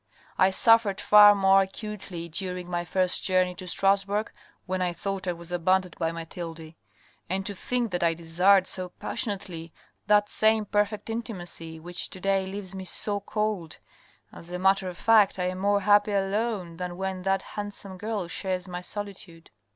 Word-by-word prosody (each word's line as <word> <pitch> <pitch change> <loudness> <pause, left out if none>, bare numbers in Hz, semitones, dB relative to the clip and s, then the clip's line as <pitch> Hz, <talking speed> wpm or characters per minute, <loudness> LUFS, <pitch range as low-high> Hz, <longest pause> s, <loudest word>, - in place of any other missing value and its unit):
" - - -29
I 185 - +6
suffered 220 0 +4
far 210 0 +8
more 195 0 +5
acutely 190 -3 -5
during 180 +1 -4
my 175 -1 -2
first 180 +1 +1
journey 185 -1 +2
to 180 +1 -9
Stras 195 +2 +3
bourg, 210 +2 -2 0.3
when 185 0 -2
I 180 -1 0
thought 195 +2 -4
I 180 - +1
was 170 +1 -7
abandoned 180 +1 +1
by 165 -1 0
Mathilde 165 -1 -7 0.3
— - - -34
and 190 +1 -2
to 205 - -2
think 240 +3 -2
that 175 - -2
I 165 -1 +2
desired 180 +4 +3
so 185 -1 -3
passionately 175 -4 -3 0.4
that 205 0 +4
same 220 0 +3
perfect 205 +2 -1
intimacy 175 -8 -4
which 175 +2 -2
to 185 - -7
day 195 0 0
leaves 195 -1 -6
me 190 -1 -6
so 205 +3 -1
cold 205 -5 -3 0.3
— - - -33
as 170 - -10
a 180 - -3
matter 190 0 +2
of 175 - -9
fact 215 -3 +4
I 180 -1 0
am 185 0 -5
more 200 +1 +2
happy 205 +1 +4
alone 195 -3 -1
than 180 0 -5
when 190 -1 -3
that 195 0 0
handsome 205 -2 -5
girl 210 -3 -3
shares 185 +1 -3
my 180 -1 -6
solitude." 190 -4 -7
190 Hz, 180 wpm, -26 LUFS, 180-205 Hz, 0.4 s, far